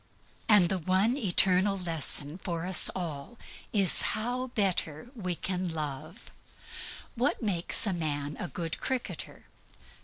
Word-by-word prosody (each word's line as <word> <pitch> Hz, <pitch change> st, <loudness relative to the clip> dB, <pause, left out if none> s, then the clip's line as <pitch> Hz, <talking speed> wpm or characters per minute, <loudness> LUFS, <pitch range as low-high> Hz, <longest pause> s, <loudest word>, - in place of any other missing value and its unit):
And 205 Hz, -5 st, +6 dB
THE 190 Hz, -, 0 dB
ONE 190 Hz, +8 st, +1 dB
ETERNAL 195 Hz, -4 st, +3 dB
LESSON 165 Hz, -2 st, -1 dB
for 170 Hz, -2 st, -4 dB
us 185 Hz, 0 st, +2 dB
all 170 Hz, +4 st, -6 dB, 0.3 s
is 195 Hz, -4 st, +6 dB, 0.2 s
how 245 Hz, +4 st, -3 dB
better 190 Hz, -, -1 dB
we 185 Hz, -8 st, -4 dB
can 185 Hz, +1 st, -3 dB
love. 155 Hz, -, -6 dB, 0.8 s
What 250 Hz, +1 st, -1 dB
makes 185 Hz, -3 st, +2 dB
a 200 Hz, -, 0 dB
man 150 Hz, -3 st, -3 dB
a -, -, -3 dB
good 165 Hz, +2 st, -5 dB
cricketer? 260 Hz, -2 st, -5 dB
185 Hz, 125 wpm, -29 LUFS, 165-210 Hz, 0.8 s, And